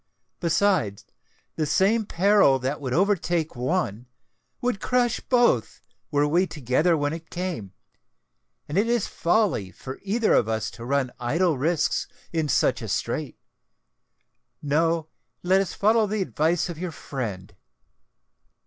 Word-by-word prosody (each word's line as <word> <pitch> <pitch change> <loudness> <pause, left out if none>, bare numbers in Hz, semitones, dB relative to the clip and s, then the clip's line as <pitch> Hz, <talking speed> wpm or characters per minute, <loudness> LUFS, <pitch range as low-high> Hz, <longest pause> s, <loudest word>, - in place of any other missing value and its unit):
Besides, 170 - +1 0.5
the 155 -2 0
same 210 +6 +2
peril 195 -6 +4
that 135 +3 -3
would 130 -3 -4
overtake 175 -2 +1
one, 125 - -2 0.5
would 245 -5 -1
crush 245 -2 +1
both, 240 - +2 0.3
were 145 0 +2
we 175 +5 +2
together 150 +4 +1
when 145 0 -1
it 165 0 -8
came; 170 - -4 0.9
and 150 +7 0
it 215 - +2
is 235 -3 +1
folly 175 - +1
for 130 +7 -9
either 215 +3 +1
of 110 - +3
us 110 -1 -2
to 115 - -10
run 135 -1 0
idle 160 +7 +1
risks 160 +4 0 0.3
in 160 -3 0
such - - +2
a - - -5
strait. - - -3 1.3
No—let 165 +4 0
us 195 - -4
follow 220 +1 +3
the 210 -1 -1
advice 165 -1 0
of 170 -3 -7
your 180 -1 -3
friend." 105 -11 -6
165 Hz, 130 wpm, -25 LUFS, 135-195 Hz, 1.3 s, peril